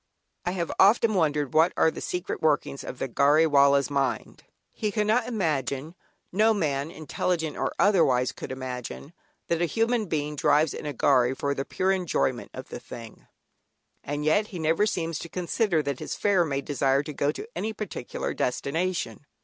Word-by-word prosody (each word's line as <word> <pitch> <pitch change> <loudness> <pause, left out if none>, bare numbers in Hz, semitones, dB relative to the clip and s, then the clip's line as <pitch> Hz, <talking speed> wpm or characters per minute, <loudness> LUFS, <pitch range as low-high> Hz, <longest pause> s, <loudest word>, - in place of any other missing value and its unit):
I 175 - 0
have 170 -3 -2
often 215 +3 +5
wondered 150 -7 +1
what 160 +3 +4
are 160 - +4
the - - -8
secret 180 +1 -3
workings 150 -3 +1
of 130 - -7
the 135 - -2
"Gharry 145 +5 +4
Wallah's" 140 -2 +4
mind. 135 -2 -2 0.3
He 210 -1 -2
cannot 215 +3 +1
imagine, 150 - -2 0.4
(no 215 +4 +3
man, 145 -5 -1
intelligent 160 0 -2
or - - -1
otherwise, 135 -11 +3
could - - -8
imagine) 130 +3 -6 0.3
that 170 0 0
a - - +4
human 225 +2 0
being 150 -2 -2
drives 150 +1 +3
in - - -6
a 145 - -3
"gharry" 130 -1 +3
for 140 +1 -1
the 135 0 -3
pure 190 +1 0
enjoyment 170 -9 0
of - - -9
the - - -6
thing; 115 -2 -11 0.8
and 145 +1 -3
yet 205 +7 +3
he 190 - -8
never 165 +6 +2
seems 165 -5 -2
to 170 - -7
consider 180 -1 0
that 140 -2 -3
his - - -4
"fare" 195 -4 +2
may 140 -3 -2
desire 140 -1 +1
to 150 - -7
go 140 +1 +1
to 420 - -8
any 220 - -2
particular 215 - -5
destination. 160 +4 -2
155 Hz, 175 wpm, -26 LUFS, 140-185 Hz, 0.8 s, often